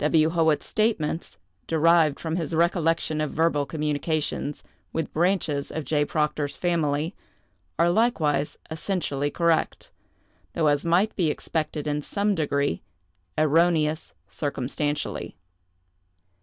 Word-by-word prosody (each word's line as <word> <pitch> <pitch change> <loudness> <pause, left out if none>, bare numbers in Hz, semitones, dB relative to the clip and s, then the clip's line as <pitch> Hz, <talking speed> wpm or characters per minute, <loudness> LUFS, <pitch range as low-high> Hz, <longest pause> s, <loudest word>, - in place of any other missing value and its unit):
W. 155 +1 +3
Howitt's 160 -3 +2
statements, 195 -7 -1 0.3
derived 165 -2 +4
from 160 -1 -3
his 165 -2 -2
recollection 165 -2 +1
of 155 - -1
verbal 150 -3 +1
communications 150 -1 -2 0.3
with 160 -2 -3
branches 165 -4 +1
of 160 - -3
J. 150 -1 +1
Proctor's 150 -2 -1
family, 160 -1 0 0.6
are 170 +1 +4
likewise 155 - +1
essentially 155 -4 -1
correct, 170 +1 0 0.6
though, 165 - 0
as 145 -1 +3
might 175 +6 +2
be 170 -5 +1
expected 155 0 -2
in 150 0 -1
some 205 +6 0
degree, 140 - 0 0.6
erroneous 155 0 +2
circumstantially. 145 +5 -3
155 Hz, 110 wpm, -25 LUFS, 150-170 Hz, 0.6 s, derived